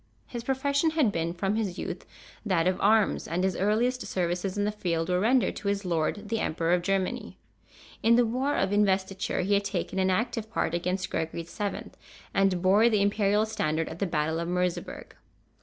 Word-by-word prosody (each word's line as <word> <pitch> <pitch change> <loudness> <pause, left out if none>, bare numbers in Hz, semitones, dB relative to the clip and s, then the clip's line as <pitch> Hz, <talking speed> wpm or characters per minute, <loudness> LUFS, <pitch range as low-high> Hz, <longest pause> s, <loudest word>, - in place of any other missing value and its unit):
His 240 -2 -6
profession 280 +4 +1
had 310 -9 +2
been 165 -2 -1
from 195 +4 -1
his 200 -5 -2
youth - - -5 0.4
that 185 -6 +1
of 185 0 0
arms, 215 +1 +3
and 175 +2 -1
his 190 -2 +1
earliest 235 +6 +1
services 180 +2 -2
in 205 - +1
the 210 - 0
field 170 -5 -2
were 180 0 +2
rendered 245 +5 +2
to 205 - -5
his 200 0 -1
lord, 180 +5 -1
the 225 0 0
Emperor 165 -1 0
of 180 - +2
Germany. 195 0 -2 0.6
In 230 +1 +5
the 245 0 +4
war 255 +5 0
of 195 +1 +1
Investiture 195 0 +1
he 195 +3 0
had 200 0 +3
taken 195 -1 -2
an 190 0 +2
active 225 +3 -1
part 170 - -1
against 180 +2 -2
Gregory 160 +1 -2
VII., 205 +3 -4 0.4
and 195 -2 +2
bore 205 +5 +5
the 210 -3 +2
Imperial 205 +1 +2
standard 165 -8 -1
at 160 - -8
the 200 - 0
battle 160 0 -1
of 170 - -3
Merseberg. 180 0 -3
195 Hz, 190 wpm, -27 LUFS, 180-220 Hz, 0.6 s, In